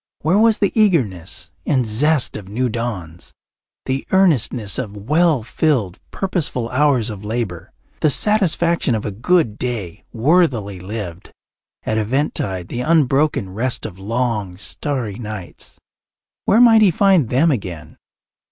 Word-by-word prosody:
Where 175 +7 +2
was 225 -1 +4
the 200 - +1
eagerness 130 - 0
and 130 - +1
zest 135 +6 +1
of 100 -3 -8
new 125 +5 -1
dawns, 90 - -6 0.5
the 135 +1 -3
earnestness 130 - +2
of 105 -5 -5
well 150 - +2
filled, 120 - 0
purposeful 155 -11 -2
hours 130 -4 +2
of 105 -1 -9
labour, 105 -6 -4 0.3
the 155 - +3
satisfaction 170 - +2
of 105 - -4
a 105 - -2
good 120 - +1
day 115 -9 -4
worthily 120 - +1
lived, 95 -2 -7 0.5
at 110 0 -1
eventide 105 - -2
the 120 - -3
unbroken 145 - +2
rest 120 +6 -2
of 95 -2 -8
long, 105 -3 -2
starry 120 -1 -3
nights? 105 -5 -8 0.7
Where 215 - +4
might 225 -2 +7
he 210 - +6
find 180 - +3
them 150 +6 +3
again? 90 - -5
120 Hz, 135 wpm, -19 LUFS, 105-155 Hz, 0.7 s, might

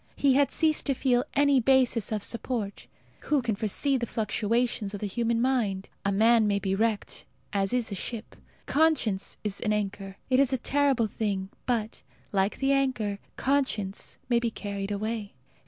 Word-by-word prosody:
He 275 -2 +3
had 280 +1 +4
ceased 315 -2 +2
to 275 - +2
feel 245 -1 +2
any 285 -1 +4
basis 250 -3 +3
of 210 -2 -1
support. 230 -3 -3 0.4
Who 295 - +2
can 230 -2 0
foresee 225 +7 +1
the 240 -2 -3
fluctuations 220 -1 -1
of - - -6
the 210 - -3
human 230 +3 0
mind! 230 -7 0
A 200 - +1
man 220 +2 +4
may 200 -1 +2
be 195 -1 -1
wrecked, 215 +1 -1 0.3
as 195 -1 +1
is 240 -3 0
a - - -2
ship. 220 +4 -6 0.3
Conscience 285 -11 +1
is 210 -2 -1
an 215 -2 +1
anchor. 195 -1 -3
It 260 0 +3
is 275 -2 +4
a 260 - +2
terrible 270 -2 +2
thing, 200 -3 -2 0.2
but, 230 -3 -1 0.3
like 195 0 +1
the 270 0 +1
anchor, 255 -7 0 0.2
conscience 255 -8 -1
may 240 -1 +3
be 235 -1 0
carried 200 -2 -5
away. 210 0 -3
225 Hz, 170 wpm, -27 LUFS, 205-260 Hz, 0.4 s, had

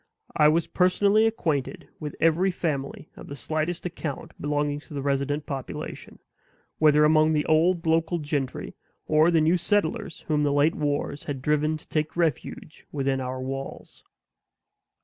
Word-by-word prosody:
I 150 - +5
was 160 +2 +3
personally 200 +4 +3
acquainted 155 - -2
with 150 -2 -6
every 165 +4 +3
family 150 -6 -3
of - - -11
the 140 - -7
slightest 155 +4 -3
account 165 -5 -5
belonging 145 0 -1
to 150 - -12
the 140 - -2
resident 140 +1 -1
population; 135 -3 -6 0.6
whether 150 -1 +5
among 155 +1 +4
the 150 -1 +1
old 170 +2 +2
local 165 +1 +2
gentry, 145 -4 -3 0.3
or 155 +2 +4
the 165 -2 +3
new 165 +4 +3
settlers 205 +1 -1
whom 150 -2 0
the 145 -1 +2
late 145 +3 +3
wars 145 -1 -2
had 140 -3 -4
driven 150 +3 +1
to - - -15
take 155 +1 -2
refuge 160 -2 -2
within 135 -2 -1
our 130 0 -4
walls. 135 +1 -7
155 Hz, 150 wpm, -26 LUFS, 145-165 Hz, 0.6 s, I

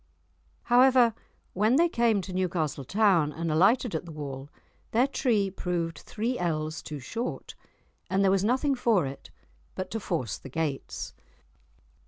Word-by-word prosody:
However, 245 -1 +5 0.4
when 215 +6 +3
they 335 +4 +5
came 235 - +2
to 185 0 -7
Newcastle 170 -6 -1
town 185 - +3
and 165 +1 -3
alighted 200 +8 +3
at 160 - -2
the 170 - -10
wall, 140 -2 -7 0.4
their 240 +3 +4
tree 215 -8 +1
proved 170 -3 -3
three 235 +4 -3
ells 155 -2 -2
too 150 - -7
short, 225 - -5 0.6
and 195 +1 +2
there 190 - +4
was 195 0 +2
nothing 260 +6 +2
for 230 - +2
it 135 +1 -8 0.5
but 185 0 -5
to 225 - -2
force 155 - -3
the 135 - -10
gates. 145 -1 -3
185 Hz, 150 wpm, -28 LUFS, 155-230 Hz, 0.6 s, However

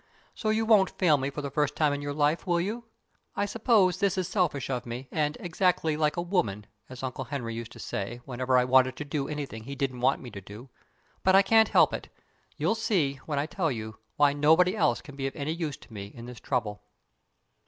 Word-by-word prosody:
So 215 - -2
you 220 +1 +1
won't 210 -4 +5
fail 170 -5 +3
me 135 0 -2
for 145 +1 -6
the 140 - -4
first 150 0 0
time 150 -2 +2
in 145 - -3
your 145 0 -3
life, 150 +5 +1
will 175 -1 +2
you? 220 +7 -3 0.5
I 205 - 0
suppose 205 -3 +2
this 195 -2 +1
is 185 -3 0
selfish 165 - 0
of 125 -2 -2
me, 125 +3 -6
and 150 -1 0
"exactly 175 -3 +1
like 150 +1 0
a 170 - 0
woman" 110 - -1 0.2
(as 130 0 -9
Uncle 130 0 -4
Henry 120 -4 -4
used 115 0 -6
to - - -13
say, 105 +2 -4
whenever 130 0 0
I 125 - +4
wanted 130 0 +4
to 150 - -6
do 140 -1 -2
anything 140 -7 -5
he 140 +2 -6
didn't 130 -3 -2
want 135 +2 +3
me 125 - -9
to 100 - -8
do), 105 +7 -11 0.5
but 190 0 +5
I 195 - +7
can't 220 +3 +5
help - - +5
it. - - -5 0.5
You'll - - +1
see, 180 -11 0
when 150 -3 -2
I 140 - +1
tell 165 -1 -1
you, 110 -2 -6 0.2
why 145 -1 +4
nobody 160 +6 +4
else 120 - +2
can 145 -2 -12
be 135 -1 -2
of 135 - -6
any 150 +2 -2
use 160 -5 -4
to - - -17
me 100 -2 -6
in 115 +3 -11
this 125 -1 -9
trouble. 105 -6 -2
145 Hz, 230 wpm, -28 LUFS, 125-175 Hz, 0.5 s, I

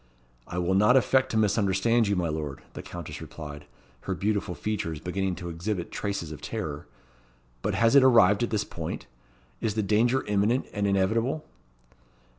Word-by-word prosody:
"I 90 - -5
will 90 +1 +1
not 105 +7 +5
affect 130 +1 +3
to 110 - -1
misunderstand 105 +2 +2
you, 100 - +1
my 90 -2 0
Lord," 75 -3 -4
the - - -6
Countess 85 -2 -8
replied, 75 -2 -8 0.4
her 95 - -1
beautiful 100 -2 -1
features 90 -8 -3
beginning 95 +1 -2
to 85 0 -6
exhibit 85 +2 -3
traces 100 -6 -3
of 75 - -8
terror. 75 -1 -5 0.7
"But - - -1
has 115 +2 +3
it 140 - +9
arrived 115 -6 +6
at 120 - 0
this 105 -2 0
point? 80 -6 -6 0.6
Is 110 -2 -1
the 110 - +1
danger 120 +6 +2
imminent 105 +5 +1
and 100 0 0
inevitable?" 110 +9 +1
100 Hz, 165 wpm, -27 LUFS, 85-110 Hz, 0.7 s, it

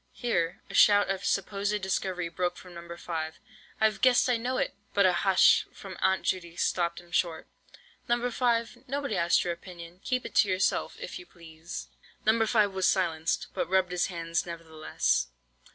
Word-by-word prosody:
Here 175 -9 -1
a - - -11
shout 205 -1 +5
of 195 0 -3
supposed 200 +1 0
discovery 185 -2 -1
broke 175 +1 -2
from 180 -1 -12
No. 170 0 -9
5. 160 -2 -5 0.4
"I've 220 -1 +2
guessed, 255 -1 +5
I - - +3
know 250 +3 -2
it!" - - -1 0.2
But 200 -1 +5
a 185 - +5
"hush" 185 +2 +4
from 190 -2 -10
Aunt 190 0 +2
Judy 170 -3 -2
stopped 170 -1 0
him 175 -1 -17
short. 165 -2 -1 0.6
"No. 240 +1 +1
5, 235 0 0
nobody 280 +1 -2
asked 170 0 +3
your 175 - -1
opinion, 170 0 -11
keep 255 -1 -1
it - - -7
to 215 - +6
yourself, 185 +1 0
if - - -6
you 360 - -13
please." 165 -1 -9 0.4
No. 225 +1 +3
5 210 -3 +3
was 190 -1 +1
silenced, 165 -4 0
but - - -2
rubbed 190 -1 +2
his 180 -1 +1
hands 170 -2 -2
nevertheless. 160 - -1
185 Hz, 175 wpm, -28 LUFS, 170-210 Hz, 0.6 s, to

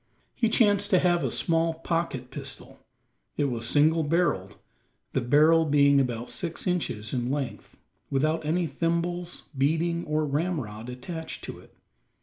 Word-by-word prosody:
He 230 - +1
chanced 205 -3 +3
to 185 - +5
have 175 -1 +2
a - - 0
small 165 -1 +1
pocket 165 -6 -3
pistol: - - -6 0.6
it - - +1
was 120 -3 -1
single 155 +5 +3
barrelled, 150 - 0 0.6
the - - +1
barrel 155 +6 +5
being 140 -2 +4
about 120 -3 -2
six 170 -3 -4
inches 125 -12 -2
in 120 -1 -1
length, 140 -2 -4 0.3
without 155 +4 0
any 170 +3 0
thimbles, 170 +3 -2
beading, 165 +5 +1
or 155 0 0
ramrod 140 -8 -3
attached 160 +6 -7
to - - -7
it. - - -19
155 Hz, 140 wpm, -27 LUFS, 135-170 Hz, 0.6 s, to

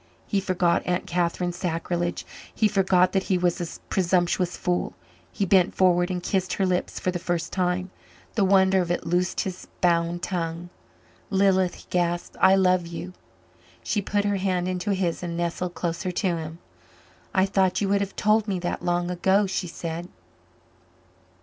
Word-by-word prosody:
He 200 - 0
forgot 180 -2 +1
Aunt 180 0 0
Catherine's 175 0 -1
sacrilege 175 -1 -2 0.3
he 220 - +2
forgot 185 -3 +3
that 195 - +2
he 190 - +3
was 175 -1 0
a 170 - -6
presumptuous 180 -1 +1
fool. 180 -1 -1 0.4
He 200 - -1
bent 185 -1 +3
forward 180 -1 +3
and 180 -1 -3
kissed 185 -1 0
her 195 - +1
lips 180 -1 -1
for 185 - 0
the 175 - -3
first 175 -1 -2
time. 180 0 0 0.4
The 215 - +2
wonder 190 0 +4
of 175 - -3
it 175 - -1
loosed 180 +2 0
his 185 -1 -6
bound 170 0 +1
tongue. 170 -1 -3 0.6
"Lilith," 190 -2 +3
he - - -14
gasped, 175 -1 -1
"I 190 0 +7
love 185 -2 +3
you." 175 +2 -7 0.7
She 210 - 0
put 205 +1 0
her 205 -1 +1
hand 185 -2 0
into 185 +2 -2
his 185 -4 -1
and 170 -1 -4
nestled 175 +1 -2
closer 175 +2 -2
to 190 +3 -1
him. 160 0 -6 0.7
"I 190 0 +3
thought 190 -1 +2
you 200 - 0
would 200 0 +2
have 200 -1 -4
told 215 +1 +2
me 195 -2 0
that 175 0 -3
long 175 0 0
ago," 190 +3 +3
she 190 -1 -2
said. 170 +1 -5
180 Hz, 170 wpm, -25 LUFS, 175-190 Hz, 0.7 s, I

